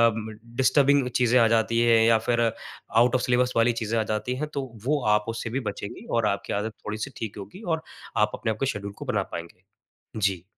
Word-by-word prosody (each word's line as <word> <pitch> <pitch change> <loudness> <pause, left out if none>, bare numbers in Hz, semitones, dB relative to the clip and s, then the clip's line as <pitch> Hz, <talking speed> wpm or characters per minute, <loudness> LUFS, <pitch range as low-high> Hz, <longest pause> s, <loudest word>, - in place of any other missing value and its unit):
म 110 -1 -6 0.2
डिस्टर्बिंग 135 +1 +4
चीज़ें 125 0 +4
आ 115 - +6
जाती 115 +1 +2
हैं 115 -1 +5
या 115 -1 +6
फिर 120 -1 +2
आउट 115 +1 0
ऑफ 125 - +2
सिलेबस 125 0 +2
वाली 115 +1 +5
चीज़ें 115 +1 -1
आ - - +2
जाती 110 +4 -2
हैं, 150 +3 -3
तो 145 -2 -4 0.2
वो 145 +1 +1
आप 105 0 0
उससे 115 0 -4
भी 135 - +1
बचेंगीं 100 - -8
और 115 -2 +2
आपकी 100 -1 -2
आदत 105 +2 -2
थोड़ी-सी 110 +6 -4
ठीक 110 -2 -5
होगी 180 - -9
और 160 -4 -1 0.4
आप 105 0 +3
अपने 110 - -2
आपको 110 +5 -2
शेड्यूल 100 -6 -3
को - - -7
बना - - 0
पाएँगे। 85 +2 -7 0.5
जी। 95 -5 0
115 Hz, 210 wpm, -26 LUFS, 105-125 Hz, 0.5 s, आ